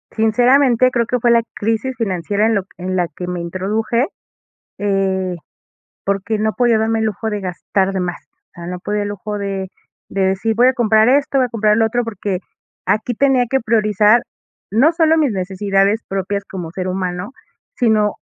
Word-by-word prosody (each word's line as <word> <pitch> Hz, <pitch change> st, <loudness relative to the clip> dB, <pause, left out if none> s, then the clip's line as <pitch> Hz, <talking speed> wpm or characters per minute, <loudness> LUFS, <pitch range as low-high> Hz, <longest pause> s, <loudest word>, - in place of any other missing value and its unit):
Sinceramente, 245 Hz, +3 st, +4 dB
creo 235 Hz, -2 st, +1 dB
que 250 Hz, +2 st, -1 dB
fue 240 Hz, -, +4 dB
la 235 Hz, 0 st, +5 dB
crisis 225 Hz, +5 st, -2 dB
financiera 200 Hz, -1 st, 0 dB
en 225 Hz, -, +2 dB
lo 200 Hz, -, 0 dB
q 190 Hz, -, -38 dB
en 185 Hz, +1 st, -3 dB
la 175 Hz, -1 st, +1 dB
que 180 Hz, +3 st, -8 dB
me 180 Hz, 0 st, -3 dB
introduje, 205 Hz, +8 st, -1 dB, 0.7 s
eh, 190 Hz, -2 st, 0 dB, 0.7 s
porque 200 Hz, +2 st, -1 dB
no 215 Hz, 0 st, 0 dB
podía 240 Hz, -3 st, +3 dB
darme 220 Hz, +1 st, +1 dB
el 220 Hz, -, 0 dB
lujo 220 Hz, +1 st, -2 dB
de 210 Hz, -1 st, -2 dB
gastar 190 Hz, +1 st, -1 dB
de 190 Hz, -, -1 dB
más, 175 Hz, -1 st, -3 dB
o -, -, -54 dB
sea, 170 Hz, 0 st, -9 dB
no 180 Hz, 0 st, -5 dB
podía 210 Hz, +3 st, -2 dB
el 205 Hz, -, -3 dB
lujo 210 Hz, +1 st, -5 dB
de 195 Hz, -2 st, -4 dB, 0.4 s
de 195 Hz, -, -2 dB
decir 195 Hz, +4 st, 0 dB
voy 245 Hz, +3 st, +5 dB
a 260 Hz, -, +4 dB
comprar 220 Hz, -2 st, +3 dB
esto, 275 Hz, +1 st, +2 dB
voy 260 Hz, -, +4 dB
a -, -, -6 dB
comprar 215 Hz, -2 st, +2 dB
lo 225 Hz, -, +4 dB
otro, 240 Hz, +2 st, 0 dB
porque 205 Hz, -4 st, -3 dB, 0.5 s
aquí 220 Hz, +3 st, 0 dB
tenía 265 Hz, 0 st, +3 dB
que 265 Hz, -, +2 dB
priorizar, 215 Hz, 0 st, +3 dB, 0.5 s
no 255 Hz, +10 st, +4 dB
solo 325 Hz, -1 st, +3 dB
mis 300 Hz, -5 st, +2 dB
necesidades 195 Hz, +2 st, 0 dB
propias 195 Hz, +1 st, -2 dB
como 175 Hz, -5 st, -7 dB
ser 185 Hz, +1 st, -4 dB
humano, 180 Hz, +2 st, -3 dB, 0.4 s
sino 215 Hz, -3 st, +2 dB
210 Hz, 190 wpm, -18 LUFS, 190-230 Hz, 0.7 s, la